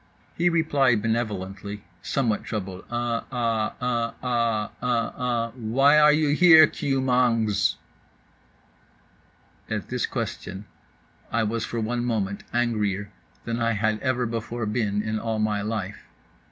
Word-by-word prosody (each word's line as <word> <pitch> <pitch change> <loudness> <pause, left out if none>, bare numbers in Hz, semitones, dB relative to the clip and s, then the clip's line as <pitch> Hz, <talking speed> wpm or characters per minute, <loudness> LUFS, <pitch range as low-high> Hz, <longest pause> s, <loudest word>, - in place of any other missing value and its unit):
He 175 +1 +3
replied 140 -9 +2
benevolently, 105 -3 -3 0.2
somewhat 120 -7 0
troubled 95 -4 -5
"uh 120 -1 -1
ah 115 -3 -1
uh 120 -2 -1
ah 115 -4 0
uh 120 -2 0
ah—why 125 +4 +2
are 150 0 +7
you 150 0 +2
here, 160 +1 +8
KEW 140 -2 -1
MANGZ?" 115 -5 +2 1.9
At - - -3
this - - -1
question 95 +2 -5 0.7
I 115 0 +1
was 110 +1 -1
for 120 - -4
one 120 +2 -1
moment 105 -5 -1
angrier 105 -4 -1 0.3
than 115 0 -2
I 115 0 +2
had 110 0 0
ever 130 -2 0
before 115 0 -3
been 105 -2 -1
in 110 0 -2
all 115 -1 -2
my 105 -1 0
life. 105 -1 -4
115 Hz, 125 wpm, -25 LUFS, 105-125 Hz, 1.9 s, here